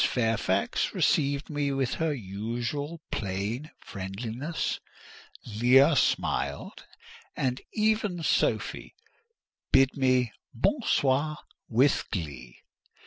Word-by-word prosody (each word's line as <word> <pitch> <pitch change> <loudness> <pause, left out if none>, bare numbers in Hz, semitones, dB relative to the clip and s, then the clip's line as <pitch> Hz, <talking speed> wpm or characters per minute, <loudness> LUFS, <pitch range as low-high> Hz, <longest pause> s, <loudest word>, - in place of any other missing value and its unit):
Fairfax 110 -5 0
received 140 0 +2
me 145 -2 -1
with 135 -2 0
her 160 -1 0
usual 120 - -4
plain 110 +3 -3
friendliness. 110 - -4 0.7
Leah 125 +7 +5
smiled, - - -1 0.5
and 130 -1 -1
even 210 -5 0
Sophie - - 0 0.8
bid 135 0 +5
me 130 -3 +2 0.2
"bon 260 - +1
soir" 145 - +1 0.3
with 130 +5 +3
glee. 70 - -6
130 Hz, 85 wpm, -28 LUFS, 110-145 Hz, 0.8 s, Leah